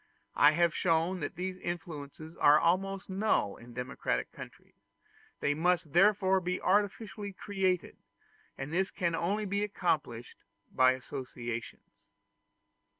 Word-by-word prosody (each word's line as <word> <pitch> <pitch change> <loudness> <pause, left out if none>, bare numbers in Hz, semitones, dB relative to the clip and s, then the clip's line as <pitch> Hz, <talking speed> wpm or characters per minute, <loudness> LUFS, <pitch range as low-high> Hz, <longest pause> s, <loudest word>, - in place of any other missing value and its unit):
I 150 +1 +6
have 170 +1 +2
shown 170 +1 +1
that 145 - -4
these 185 +2 -4
influences 160 -3 -6
are 150 +1 +6
almost 195 +3 0
null 190 - 0
in 120 0 -14
democratic 125 +2 -2
countries; - - -12 0.7
they 145 - +2
must 165 -1 +1
therefore 190 0 +4
be 180 +1 -2
artificially 205 +1 0
created, 190 -2 -1 0.6
and 135 +3 -6
this 190 +2 +1
can 170 -3 -1
only 200 +6 -1
be 200 +1 -1
accomplished 155 - -2 0.3
by 130 0 +5
associations. 125 -3 -7
175 Hz, 120 wpm, -31 LUFS, 145-190 Hz, 0.7 s, I